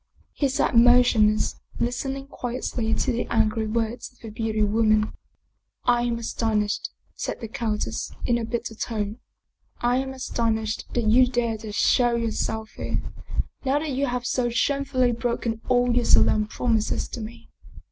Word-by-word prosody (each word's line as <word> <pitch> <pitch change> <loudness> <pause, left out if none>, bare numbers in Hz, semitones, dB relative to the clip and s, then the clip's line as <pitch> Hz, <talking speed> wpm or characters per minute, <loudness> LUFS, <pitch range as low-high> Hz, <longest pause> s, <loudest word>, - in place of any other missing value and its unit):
He 280 - 0
sat 265 - +1
motionless, 230 -3 +5 0.2
listening 270 +3 -2
quietly 245 -3 -2
to - - 0
the 240 0 -2
angry 220 0 +1
words 225 +2 -2
of 250 - -28
the 225 -3 -9
beautiful 220 -1 0
woman. 215 -1 +3 0.4
" - - -50 0.2
I 240 -1 +3
am 240 -1 0
astonished," 220 -2 -1 0.2
said - - -4
the 230 - -5
countess, 220 -3 -2
in 235 -1 +2
a - - -3
bitter 230 0 -3
tone. 215 0 -3 0.3
" - - -44
I 245 +1 +2
am 265 0 -2
astonished 225 -4 -1
that 240 -2 +1
you 250 +4 +6
dare 235 -3 -1
to 215 -1 -7
show 240 +3 +3
yourself 220 -1 -2
here, - - -2 0.6
now 275 +1 +2
that 300 0 -2
you 275 +2 0
have 245 0 -2
so 245 0 +1
shamefully 255 0 +1
broken 235 -1 -2
all 245 -1 +3
your 245 -1 +2
solemn 215 0 +4
prom 230 +1 +1
ises 215 - -1
to 240 - -5
me. 230 +2 -10
235 Hz, 165 wpm, -25 LUFS, 220-245 Hz, 0.6 s, you